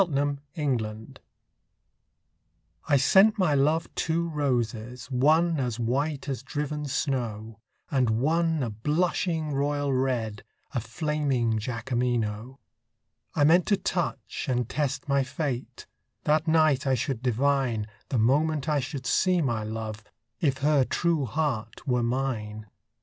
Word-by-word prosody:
The 145 0 0 0.2
White 140 -6 +1
Flag 110 0 -7 1.7
I 140 - +5
sent 195 - +5
my 180 -7 +2
love 150 +4 +2
two 170 +1 0
roses, 125 -4 -2
one 155 +5 +3
As 125 -3 -2
white 140 +5 -1
as 135 -4 -3
driven 150 +2 -3
snow, 115 -6 -2 0.3
And 130 -4 +2
one 160 +6 +1
a 115 - -2
blushing 155 - 0
royal 145 0 0
red, 120 -5 -1 0.3
A 125 - 0
flaming 130 -3 0
Jacqueminot. 120 0 -2 0.8
I 145 - +3
meant 165 +4 +5
to 200 - +3
touch 175 -4 -3
and 125 -2 0
test 145 0 -2
my 140 -1 +3
fate; 130 -1 -4 0.4
That 155 +2 +2
night 155 -4 +3
I 130 - +3
should 130 -1 -2
divine, 130 -2 +1 0.2
The 130 - 0
moment 145 +6 +2
I 150 -2 +2
should 135 0 -5
see 185 +5 +3
my 120 -8 0
love, 110 0 -5 0.4
If 140 -5 +1
her 150 -3 +4
true 165 +1 0
heart 130 -6 -2
were 125 -2 +2
mine. 115 -4 -2
135 Hz, 130 wpm, -27 LUFS, 120-150 Hz, 1.7 s, I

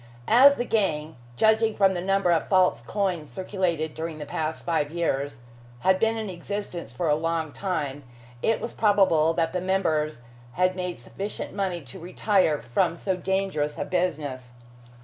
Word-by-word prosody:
As 270 +5 +7
the 245 - -2
gang 160 -9 0 0.2
judging 220 0 +3
from 195 -1 +4
the 175 - -3
number 195 -1 +2
of 165 - +1
false 185 - +3
coins 175 - -2
circulated 180 -5 -2
during 160 0 -5
the 150 - -6
past 155 +2 -3
five 160 -4 0
years 145 -5 -2 0.4
had 190 0 +3
been 225 +1 +2
in 220 -1 -3
existence 180 - -5
for 160 +8 -2
a 150 - +4
long 160 0 -1
time, 145 -7 -3 0.4
it 225 - +1
was 235 - -5
probable 190 -7 +3
that 165 -1 0
the 180 - -1
members 155 -7 0 0.3
had 185 +1 +2
made 180 -6 -4
sufficient 195 - -5
money 185 -4 -2
to 135 +6 -11
retire 180 -2 +1
from 120 +7 0
so 190 +2 -1
dangerous 185 -5 -1
a - - -2
business. 145 -9 -2
175 Hz, 165 wpm, -26 LUFS, 155-195 Hz, 0.4 s, As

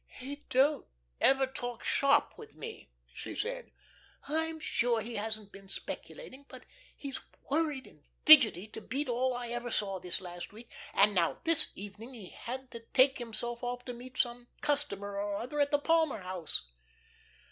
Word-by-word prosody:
"He 275 +3 -7
don't 280 +3 +3 0.3
ever 270 0 +5
talk 245 -2 -6
shop 280 +1 +3
with 445 0 -13
me," 460 -1 -9 0.2
she - - -7
said. - - -3 0.6
"I'm 320 +2 -1
sure 240 -6 +1
he 225 +1 -4
hasn't 215 -1 -4
been 195 -1 -14
speculating, 280 - -8
but - - -12 0.3
he's 275 -2 -5 0.3
worried 295 -3 0
and 150 - -18 0.2
fidgety 260 - +9
to 220 - -8
beat 275 +7 -2
all 250 +1 +1
I 245 -1 -4
ever 240 0 -3
saw, 195 -4 -1
this 180 -1 -2
last 175 +1 -8
week; 230 +2 -12 0.2
and 205 +1 +5
now 175 -4 +2
this 330 -2 +6
evening 205 +6 -8
he 205 -6 -10
had 260 +2 -7
to 235 - -7
take 260 +4 +3
himself 240 +1 -4
off 245 0 -4
to 245 - -5
meet 250 +2 -11
some 240 0 -1
customer 205 -9 +2
or 205 0 -2
other 250 +8 -4
at 285 0 +3
the 290 - +3
Palmer 320 -6 +2
House." 180 - 0
245 Hz, 170 wpm, -31 LUFS, 210-280 Hz, 0.6 s, fidgety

